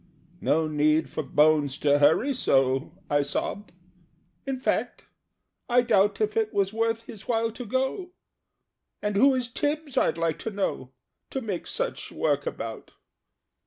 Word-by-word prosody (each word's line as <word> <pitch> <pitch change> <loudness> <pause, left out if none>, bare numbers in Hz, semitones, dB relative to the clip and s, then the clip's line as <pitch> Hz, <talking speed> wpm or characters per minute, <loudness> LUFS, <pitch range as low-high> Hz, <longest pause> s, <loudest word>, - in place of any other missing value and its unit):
"No 160 +1 +2
need 155 +1 +2
for - - -2
Bones 150 -1 +3
to 145 -1 +3
hurry 160 - +4
so!" 135 - +1 0.2
I 145 0 +2
sobbed. 170 +8 -4 0.8
"In 265 -1 -2
fact, - - -1 0.7
I 245 0 +4
doubt 205 -4 +3
If 215 -1 0
it 220 -1 +1
was 200 0 +1
worth 225 0 0
his 215 -3 -11
while 230 -1 +1
to 240 +2 -8
go 265 - -1 0.9
And 210 -1 -1
who 265 +6 +5
is 250 -2 -1
Tibbs, 290 +3 -1
I'd - - +1
like 165 -2 -1
to - - -4
know, 195 -10 -3 0.4
To 265 - -3
make 200 -7 -4
such - - -3
work - - 0
about? - - -6
210 Hz, 150 wpm, -26 LUFS, 155-245 Hz, 0.9 s, who